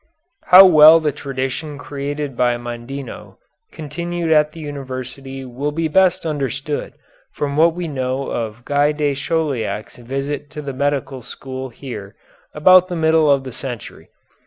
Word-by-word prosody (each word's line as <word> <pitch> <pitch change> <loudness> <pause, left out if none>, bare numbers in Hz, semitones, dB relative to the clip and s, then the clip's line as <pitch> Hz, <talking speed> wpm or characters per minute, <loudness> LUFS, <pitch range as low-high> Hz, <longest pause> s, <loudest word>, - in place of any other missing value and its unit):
How 185 +2 +10
well 160 -2 +8
the 155 -2 0
tradition 135 +2 -4
created 145 -1 -5
by 120 0 +1
Mondino 120 +3 -8 0.3
continued 170 +2 -4
at 150 -1 +4
the 165 - -12
university 135 -2 -7
will 135 +4 -3
be 160 +2 -1
best 185 +2 +2
understood 145 -1 -3 0.4
from 140 -1 -3
what 165 +2 +4
we 175 -1 -4
know 130 -2 -3
of 115 0 -4
Guy 145 +1 +2
de 150 -1 0
Chauliac's 140 -7 -2
visit 135 +4 -4
to 150 - -8
the 140 -1 -5
medical 140 -1 -2
school 130 +2 -7
here 115 -5 -9 0.4
about 185 +4 +6
the 180 - -4
middle 160 -1 +3
of 140 -1 +3
the 130 -2 -8
century. 120 -5 -8
145 Hz, 145 wpm, -19 LUFS, 130-155 Hz, 0.4 s, How